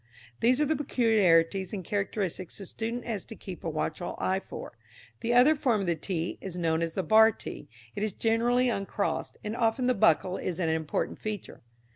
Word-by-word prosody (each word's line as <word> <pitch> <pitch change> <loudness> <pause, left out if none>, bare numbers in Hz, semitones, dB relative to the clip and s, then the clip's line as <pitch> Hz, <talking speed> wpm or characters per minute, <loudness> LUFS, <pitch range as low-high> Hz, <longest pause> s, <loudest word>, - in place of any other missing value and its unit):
These 250 +3 +3
are 300 - +3
the 315 - +1
peculiarities 195 - +2
and 190 -4 -4
characteristics 195 -3 -2
the 195 - -7
student 230 +5 -4
has 220 -5 -3
to 225 - -8
keep 185 -4 -9
a 165 - -2
watchful 160 +2 -3
eye 190 +1 0
for. - - -9 0.4
The 240 +1 0
other 255 +6 +7
form 245 -8 +1
of - - -2
the 170 -1 +1
t 165 +1 -3
is 185 -2 -6
known 165 -2 +1
as 165 -1 -2
the 190 - 0
bar 220 +5 +6
t. 150 - -9 0.3
It - - -3
is 215 0 0
generally 235 +4 +2
uncrossed, 200 -3 -2
and 210 +1 -3
often 235 +1 +1
the 255 - +3
buckle 185 -2 +3
is 180 -1 -4
an 170 -3 +1
important 160 -1 -1
feature. 215 -3 -6
200 Hz, 195 wpm, -28 LUFS, 175-230 Hz, 0.4 s, other